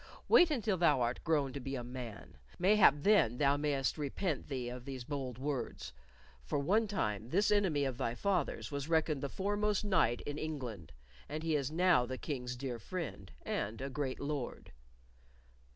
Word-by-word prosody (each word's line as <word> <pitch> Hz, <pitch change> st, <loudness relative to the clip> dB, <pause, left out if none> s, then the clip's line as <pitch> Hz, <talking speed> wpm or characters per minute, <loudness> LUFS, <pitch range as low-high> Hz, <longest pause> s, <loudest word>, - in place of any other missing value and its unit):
"Wait 350 Hz, -, +7 dB
until 225 Hz, -9 st, 0 dB
thou 155 Hz, -6 st, +4 dB
art 120 Hz, 0 st, -1 dB
grown 145 Hz, -5 st, +1 dB
to 140 Hz, -, -4 dB
be 135 Hz, +1 st, -4 dB
a 125 Hz, -, -4 dB
man. 120 Hz, -, -8 dB, 0.2 s
Mayhap 190 Hz, -4 st, +6 dB
then 125 Hz, -, +4 dB
thou 140 Hz, 0 st, +4 dB
mayst 145 Hz, 0 st, 0 dB
repent 150 Hz, +2 st, -2 dB
thee 130 Hz, -4 st, -3 dB
of 125 Hz, 0 st, -6 dB
these 130 Hz, -2 st, -6 dB
bold 135 Hz, -3 st, -4 dB
words, 135 Hz, -, -4 dB, 0.5 s
for -, -, -2 dB
one 205 Hz, +11 st, +2 dB
time 110 Hz, -, -2 dB
this 200 Hz, +8 st, +2 dB
enemy 190 Hz, -9 st, +3 dB
of 130 Hz, -3 st, -3 dB
thy 115 Hz, -, -1 dB
father's 150 Hz, -, -1 dB
was 140 Hz, +1 st, -4 dB
reckoned 160 Hz, -3 st, +2 dB
the 140 Hz, -, -2 dB
foremost 205 Hz, +3 st, 0 dB
knight 165 Hz, -, +2 dB
in 145 Hz, +1 st, -5 dB
England, 125 Hz, -, -5 dB, 0.4 s
and 155 Hz, +2 st, -4 dB
he 160 Hz, -1 st, +1 dB
is 140 Hz, -2 st, 0 dB
now 170 Hz, -4 st, +4 dB
the 130 Hz, +1 st, -4 dB
King's 125 Hz, -4 st, -4 dB
dear 125 Hz, -2 st, -4 dB
friend 145 Hz, -, -6 dB
and 110 Hz, +2 st, -2 dB
a 135 Hz, +1 st, -4 dB
great 130 Hz, -1 st, -3 dB
lord." 140 Hz, -3 st, -4 dB
140 Hz, 175 wpm, -34 LUFS, 125-170 Hz, 0.5 s, Wait